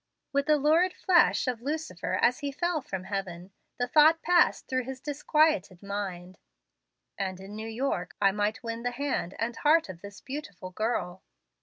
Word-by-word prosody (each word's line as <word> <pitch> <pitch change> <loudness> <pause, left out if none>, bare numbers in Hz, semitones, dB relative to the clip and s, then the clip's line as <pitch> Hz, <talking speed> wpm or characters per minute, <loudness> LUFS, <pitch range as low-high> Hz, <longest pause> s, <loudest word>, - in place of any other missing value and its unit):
With 280 +1 +1
the 305 -1 +5
lurid 320 +6 +3
flash 365 -2 +3
of 245 -3 -2
Lucifer 295 - -3
as 245 +1 +3
he 285 -1 -3
fell 345 +2 -1
from 190 -8 -5
heaven, 190 -2 -5 0.3
the 245 - 0
thought 310 +5 +5
passed 350 0 +3
through 255 -2 -1
his 265 0 -6
disquieted 295 - +1
mind, 190 -3 -5 0.8
"And 190 -2 -3
in 195 +2 -10
New 220 +1 -5
York 225 -7 -2
I 195 -1 +4
might 210 +3 -1
win 230 0 -4
the 245 - -1
hand 245 -7 -3
and 230 +2 -2
heart 315 -3 +3
of 175 -2 -9
this 200 0 -10
beautiful 205 -10 -7
girl." 190 -3 -2
240 Hz, 170 wpm, -28 LUFS, 195-295 Hz, 0.8 s, the